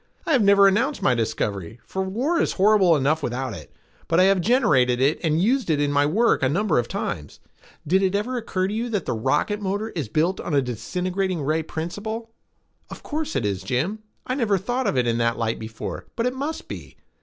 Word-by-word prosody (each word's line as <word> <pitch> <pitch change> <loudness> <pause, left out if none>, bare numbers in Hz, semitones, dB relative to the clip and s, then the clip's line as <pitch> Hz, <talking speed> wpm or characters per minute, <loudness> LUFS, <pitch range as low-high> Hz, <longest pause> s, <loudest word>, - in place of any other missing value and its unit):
I - - -1
have 270 -6 +4
never 200 -1 +6
announced 235 +9 +1
my 130 - +4
discovery, 110 -3 -2
for 190 - -3
war 250 - 0
is - - 0
horrible 195 -3 +4
enough 150 +3 +1
without 130 -1 -3
it, 80 -6 -10 0.4
but 165 - +2
I - - +7
have 195 -1 +4
generated 150 - +3
it 140 +4 +2
and 160 -1 +2
used 240 +4 +1
it 150 -2 +2
in 145 0 +1
my 145 0 +3
work 225 +10 +2
a 130 - +2
number 195 +1 +1
of 120 - -2
times. 75 -1 -5 0.5
Did 190 +5 +3
it 190 -1 +1
never 210 +6 -1
occur 195 -6 -1
to 200 - -4
you 230 +3 -2
that 205 -6 -2
the - - -1
rocket 145 - 0
motor 205 +3 -2
is 155 - -4
built 165 - +1
on - - -2
a 140 - +4
disintegrating 180 - -2
ray 155 +3 +1
principle?" 205 +9 -5 0.6
"Of - - -10
course 310 - -3
it 130 -5 0
is, 100 -2 -1
Jim. 130 - -1 0.3
I 255 - -2
never 225 -7 +1
thought 245 +7 -2
of - - 0
it 125 - +2
in 115 0 0
that 115 0 +1
light 115 -1 -1
before, 110 0 -6
but 230 - -1
it 250 - 0
must 285 +5 -4
be. - - -9
180 Hz, 220 wpm, -23 LUFS, 130-215 Hz, 0.6 s, I